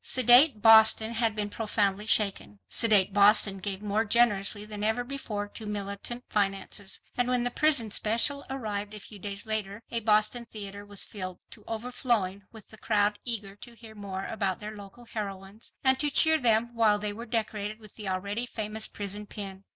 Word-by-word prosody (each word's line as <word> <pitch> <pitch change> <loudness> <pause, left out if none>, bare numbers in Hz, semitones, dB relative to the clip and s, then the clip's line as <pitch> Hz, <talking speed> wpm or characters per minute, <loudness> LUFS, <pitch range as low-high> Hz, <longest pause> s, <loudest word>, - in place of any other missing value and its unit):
Sedate 250 -1 +6
Boston 220 0 +6
had 225 -2 0
been 205 -1 -3
profoundly 210 -2 -1
shaken. 200 - +2
Sedate 200 - +3
Boston 200 -1 +5
gave 195 +1 -3
more 210 +1 0
generously 210 -2 +2
than 210 -1 -7
ever 220 +3 0
before 240 -6 -4
to 220 +1 -7
militant 205 +4 -5
finances. 195 0 -2 0.2
And 245 -1 0
when 250 -1 +1
the 245 - +1
"Prison 275 -7 +2
Special" 235 +8 +2
arrived 210 -5 -4
a - - -6
few 205 0 -11
days 200 +2 -5
later 215 -1 -3
a 235 - 0
Boston 215 +2 +1
theatre 200 -1 -7
was 205 -1 0
filled 185 -3 -7
to 215 - -8
overflowing 225 -4 -2
with 220 -1 -15
a - - -11
crowd 205 -1 +1
eager 210 -5 -4
to 235 +2 -13
hear 225 -2 -14
more 195 -2 -6
about 195 -4 -3
their 215 +1 -8
local 205 +4 -13
heroines, 200 -1 -8
and 260 0 +3
to 295 - +2
cheer 315 +2 +4
them 235 -1 +2
while 220 -3 +3
they 205 0 -2
were 230 +2 -9
decorated 215 -2 -3
with 215 -3 -15
the 210 -3 -6
already 200 +6 -3
famous 215 -1 -3
prison 205 +1 -6
pin. 195 -2 -8
215 Hz, 180 wpm, -27 LUFS, 200-230 Hz, 0.2 s, Sedate